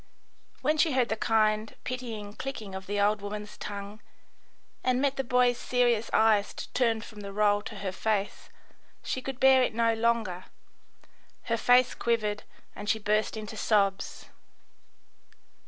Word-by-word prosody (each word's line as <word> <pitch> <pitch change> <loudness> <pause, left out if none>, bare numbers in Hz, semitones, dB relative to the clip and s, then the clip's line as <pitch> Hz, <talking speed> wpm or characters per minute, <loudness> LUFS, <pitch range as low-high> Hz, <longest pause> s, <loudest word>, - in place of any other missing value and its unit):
When 305 0 +1
she 310 -2 +3
heard 255 -2 +2
the 220 - 0
kind, 215 -1 +1
pitying 230 -5 -5
clicking 220 -6 -6
of 190 0 -7
the 205 +1 -1
old 205 0 +2
woman's 210 +1 -6
tongue, 205 +1 -7 0.8
and 255 0 +2
met 275 0 +1
the 270 - -1
boy's 250 -1 +2
serious 240 -3 +1
eyes 215 -2 +3 0.2
turned 230 -3 +1
from 215 - -12
the 200 -1 -7
roll 205 0 +2
to 215 - -8
her 195 -2 -4
face, 205 +1 -2 0.5
she 260 - -3
could 265 -1 -6
bear 265 -1 +6
it 245 - 0
no 230 0 +3
longer; 225 -5 0 1.0
her 230 - -1
face 250 +2 +4
quivered 215 -3 -1 0.3
and 205 +1 -6
she 220 - +3
burst 215 +1 0
into 215 0 -7
sobs. 200 -2 0
220 Hz, 150 wpm, -28 LUFS, 205-245 Hz, 1.0 s, bear